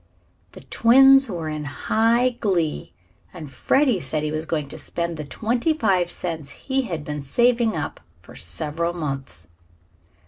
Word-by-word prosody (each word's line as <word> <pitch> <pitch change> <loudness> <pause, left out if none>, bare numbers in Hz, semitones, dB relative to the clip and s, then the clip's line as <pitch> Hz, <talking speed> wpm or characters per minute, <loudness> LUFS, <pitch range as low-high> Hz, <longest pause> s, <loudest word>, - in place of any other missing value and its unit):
The - - -11
twins 270 +2 +6
were 170 -5 -4
in 155 -1 -4
high 225 - +1
glee, 175 -8 -1 0.4
and 155 -6 -9
Freddie 250 - +2
said 150 0 -3
he 150 - -2
was 155 +1 -3
going 150 -3 -2
to - - -7
spend 170 0 -3
the 155 - -5
twenty 235 - -1
five 185 - +2
cents 165 -5 -5
he 270 - -2
had 160 -4 -4
been 150 -1 -4
saving 235 - +2
up 150 - -4 0.2
for - - -16
several 150 - -2
months. 135 - -4
170 Hz, 150 wpm, -23 LUFS, 150-230 Hz, 0.4 s, twins